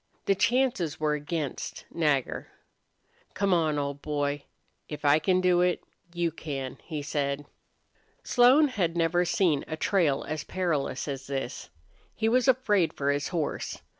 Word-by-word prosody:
The 195 - +4
chances 235 - +1
were 155 -1 +1
against 150 -1 -4
Nagger. 150 -6 0 0.9
"Come 200 -1 +2
on, 160 -3 +2
old 140 0 -3
boy. 145 -1 -2 0.4
If 150 -1 -6
I 145 +2 +6
can 185 +2 +2
do 180 -1 +4
it, 180 0 +1 0.3
you 170 -1 -1
can," 140 -5 -5
he 155 -4 -5
said. 145 0 -2 0.8
Slone 265 +5 +5
had 175 -8 -1
never 170 +1 +2
seen 175 -7 +2
a 155 - -4
trail 160 -7 +1
as 155 -1 -3
perilous 160 -8 -2
as 135 -2 -5
this. 135 -2 -4 0.5
He 220 - 0
was 250 +3 +3
afraid 210 -9 +3
for 140 0 0
his 145 0 -1
horse. 165 -4 -3
160 Hz, 145 wpm, -28 LUFS, 145-185 Hz, 0.9 s, I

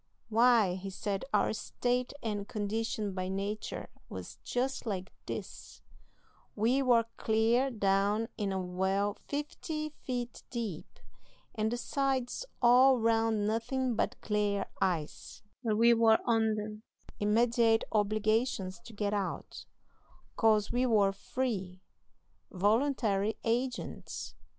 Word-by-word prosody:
Why, 230 -4 +5
he 195 +1 -6
said 195 +1 -3
our 210 0 +2
state 245 +3 -1
and 205 -2 -2
condition 215 -1 -2
by 185 0 -3
natur 200 +3 -3 0.2
war - - -6 0.2
just 255 0 -2
like 190 -3 -3
this: - - -7 0.7
We 235 +6 +2
war 240 -3 +4
clear 230 +4 +2
down 205 0 +1
in 205 -3 -2
a 190 - -1
well 190 +3 0
fifty 305 +1 -3
feet 245 -5 -5
deep, 225 -10 -4 0.7
and 220 0 0
the 240 - -1
sides 270 - -1 0.2
all 255 +2 +7
round 225 -2 +2
nothin' 235 +3 0
but - - -1
glare 205 -2 0 0.2
ice; 175 -6 -2 0.2
but 220 -3 +1
we 235 +1 +6
war 225 -1 +5
under 215 -2 0 0.4
immediate 225 +1 +3
obligations 215 -1 +1
to 230 - -11
get 205 -1 -1
out, 200 -2 -4 0.7
'cause 215 -2 +3
we 245 +1 +1
war 205 -4 +4
free, 195 -4 -3 0.7
voluntary 215 0 +1
agents. 245 +2 -3
220 Hz, 115 wpm, -31 LUFS, 205-240 Hz, 0.7 s, all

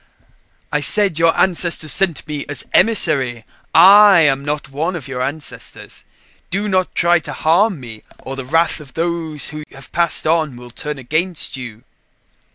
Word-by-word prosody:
"I 150 - 0
said 190 +1 +2
your 165 0 +2
ancestors 170 -4 0
sent 175 +1 0
me 150 -2 -4
as 145 -3 -2
emissary 145 - +2 0.3
I 195 +2 +7
am 140 -3 +2
not 145 -1 -3
one 160 +6 -3
of 145 -6 -7
your 130 -2 -5
ancestors. 135 -3 -6 0.4
Do 200 +3 -2
not 185 -2 -1
try 175 0 +3
to - - -8
harm 180 +3 +1
me 115 -4 -11 0.2
or 135 - -8
the 135 - -6
wrath 165 +6 0
of 145 -3 -15
those 165 -3 -1
who 150 0 -8
have 135 -1 -14
Passed 170 -1 +2
On 155 -4 0
will 120 0 -12
turn 150 +4 -6
against 155 +7 -2
you." 120 -3 -9
155 Hz, 165 wpm, -17 LUFS, 135-175 Hz, 0.4 s, I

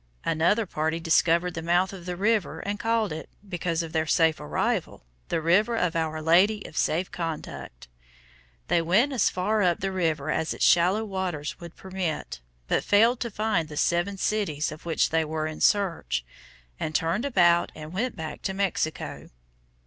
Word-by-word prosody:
Another 170 +8 +2
party 160 -1 -2
discovered 170 +1 +2
the 165 - -4
mouth 175 +3 +1
of 185 -2 -10
the 180 - -3
river 195 -5 0
and 205 +1 -3
called 225 -5 0
it, 160 - -7 0.2
because 170 -2 -2
of 165 -1 -8
their 160 -1 0
safe 160 0 +3
arrival, 75 -4 -2 0.3
The 165 - 0
River 205 +9 +3
of 180 -4 0
Our 160 -1 -2
Lady 195 +6 +4
of - - -10
Safe 175 +5 0
Conduct. 160 - -6 0.8
They 170 - +3
went 210 - +2
as 245 - +3
far 210 +4 0
up 175 -3 +2
the 195 0 -2
river 160 -5 -1
as 160 - -1
its - - +1
shallow 185 +6 +4
waters 185 -7 -4
would 170 -1 -10
permit, 185 - -4 0.3
but - - +1
failed 230 +4 +4
to 235 - -2
find 210 -7 -1
the 150 - -8
seven 175 +5 +1
cities 190 -9 -1
of 155 +2 -10
which 165 - +1
they 165 0 +2
were 155 0 -3
in 155 0 -6
search, 175 - +1 0.5
and 155 - -3
turned 165 - +1
about 175 -10 +3
and 155 +1 -9
went 245 +6 -2
back 160 -1 -6
to 190 - -3
Mexico. 190 -5 -2
175 Hz, 175 wpm, -26 LUFS, 160-200 Hz, 0.8 s, Lady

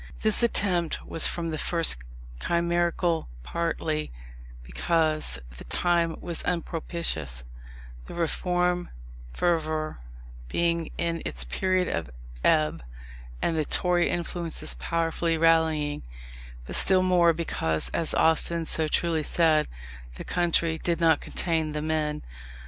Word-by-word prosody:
This 215 +1 +1
attempt 185 -8 +1
was 165 - +4
from 165 -1 -3
the 155 - -3
first 165 - +3 0.4
chimerical: 170 - 0
partly 160 - -2 0.5
because 155 - 0 0.2
the - - -9
time 170 -2 +1
was 170 -2 -3
unpropitious, 165 - -2 0.6
the - - -9
Reform 175 +1 0 0.4
fervour 155 - -1 0.5
being 170 - 0
in 170 -1 -1
its 60 0 -3
period 185 - 0
of 80 -4 -3 0.3
ebb, 75 0 +2 0.6
and 165 - +1
the 155 - +1
Tory 175 +3 +2
influences 170 -1 -2
powerfully 165 0 -1
rallying; 160 - +2 0.6
but - - -4
still 185 -1 +5
more, 180 -2 +5
because, 80 - -1
as 165 - -1
Austin 165 +1 +2
so 160 0 +2
truly 165 0 +1
said, 155 -1 +3 0.5
"the - - -7
country 170 -2 +1
did 170 -1 -1
not 165 -1 +4
contain 160 -3 -1
the 150 - -2
men." 155 -1 -1
165 Hz, 115 wpm, -27 LUFS, 155-170 Hz, 0.6 s, still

